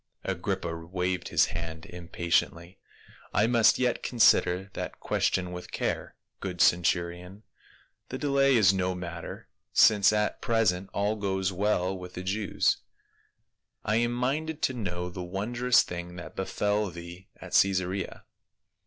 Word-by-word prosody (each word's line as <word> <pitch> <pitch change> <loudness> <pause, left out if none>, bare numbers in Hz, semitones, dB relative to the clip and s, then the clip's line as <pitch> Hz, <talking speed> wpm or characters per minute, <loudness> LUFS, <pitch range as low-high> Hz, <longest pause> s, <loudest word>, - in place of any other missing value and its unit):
Agrippa 85 -1 -2
waved 90 +1 -2
his - - +4
hand 80 -1 -6
impatiently, 85 0 -2 0.3
" - - -23
I 105 - +4
must 115 -1 +4
yet 125 -2 0
consider 95 -5 +3
that - - -6
question 90 -1 0
with 90 0 -8
care, - - -3 0.2
good 90 -3 -5
centurion; 90 +3 +1 0.7
the 130 - -4
delay 140 -1 +3
is 100 -5 +5
no 95 -1 -1
matter, 85 -2 -7 0.3
since 105 -1 +6
at 105 0 0
present 100 -6 +1
all 105 +2 0
goes 95 -2 -1
well 95 -1 0
with 90 -1 -9
182 - - -14
PAUL. 95 +2 -3
the - - -11
Jews. - - +3 1.1
I 110 +1 +2
am 120 +1 +1
minded 145 +6 -2
to 130 - +2
know 90 -6 -4
the 90 - -6
wondrous 120 +8 +2
thing 90 0 -7
that 90 - -9
befell 105 +2 -1
thee 85 +2 -10
at - - -10
Caesarea." 95 0 +1
95 Hz, 145 wpm, -28 LUFS, 90-110 Hz, 1.1 s, since